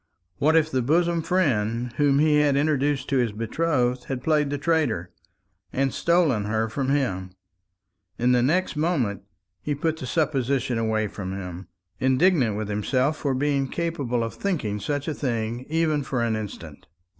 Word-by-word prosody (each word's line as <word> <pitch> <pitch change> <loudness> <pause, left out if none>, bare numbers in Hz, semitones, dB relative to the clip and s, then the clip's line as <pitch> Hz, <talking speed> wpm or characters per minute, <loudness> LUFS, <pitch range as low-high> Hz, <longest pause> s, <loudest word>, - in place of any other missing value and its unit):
What 155 +3 +3
if 160 -1 +3
the 130 - +1
bosom 170 +6 +2
friend 120 - 0
whom 145 -2 +3
he 150 0 +4
had 145 -2 +3
introduced 145 -2 +1
to 135 - +2
his 120 -3 +1
betrothed 125 +2 0
had 130 -2 -4
played 150 -2 +2
the 145 - -2
traitor, 140 - 0 0.6
and 135 0 0
stolen 165 -11 +2
her 110 +1 0
from 135 +3 -2
him! 95 -10 -1 0.8
In 125 +1 +2
the 125 -1 +4
next 170 +8 +1
moment 150 - 0 0.4
he 145 - -2
put 160 +2 -1
the 130 - -6
supposition 135 -5 0
away 110 -1 0
from 95 -2 -6
him, 90 -1 -7 0.3
indignant 130 - +3
with 110 -1 -3
himself 125 +8 0
for 140 -3 -1
being 140 0 +1
capable 140 -7 -2
of 115 - -4
thinking 135 - -2
such 145 +5 -3
a 155 - -1
thing, 120 -2 -3
even 160 -2 +1
for 130 -3 -2
an 115 -1 0
instant. 85 -8 -7
135 Hz, 165 wpm, -25 LUFS, 115-155 Hz, 0.8 s, he